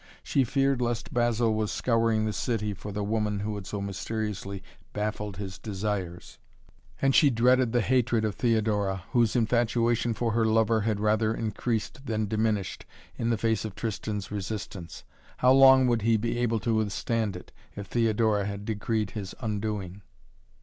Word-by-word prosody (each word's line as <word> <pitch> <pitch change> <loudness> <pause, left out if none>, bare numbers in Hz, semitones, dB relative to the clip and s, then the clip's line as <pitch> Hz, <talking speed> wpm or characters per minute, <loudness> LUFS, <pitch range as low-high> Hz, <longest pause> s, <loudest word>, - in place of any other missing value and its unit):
She 135 - +2
feared 135 +1 +1
lest 120 -1 -2
Basil 120 -1 +2
was 110 -1 -1
scouring 115 -2 +1
the 110 - -1
city 105 +1 -1
for 100 +2 -8
the 105 +1 -3
woman 105 -1 -1
who 105 +1 -2
had 100 -2 -7
so 100 - -4
mysteriously 100 0 -4 0.3
baffled 105 -2 -3
his 95 -2 -6
desires, 95 -4 -4 0.6
and 135 0 +4
she 145 - +6
dreaded 125 0 +3
the 120 0 +2
hatred 120 -1 +2
of 105 - -1
Theodora, 105 -5 0
whose 120 -3 +2
infatuation 120 0 +1
for 115 0 -1
her 115 +1 +2
lover 110 0 +3
had 105 -1 0
rather 110 +1 +2
increased 115 +4 -3
than 110 -2 0
diminished 105 -3 -1 0.4
in 115 - 0
the 115 - +1
face 110 -1 0
of 110 -3 -6
Tristan's 105 -2 -4
resistance. 100 -3 -6 0.3
How 125 - +4
long 135 -1 +7
would 120 -2 +2
he 115 +1 +3
be 115 +2 -2
able 115 -2 +1
to 115 +3 0
withstand, 110 -2 -1 0.2
if 100 - -6
Theodora 110 -3 +1
had 100 0 -5
decreed 110 -1 -1
his 100 -4 -6
undoing? 105 -4 -3
110 Hz, 160 wpm, -27 LUFS, 105-115 Hz, 0.6 s, long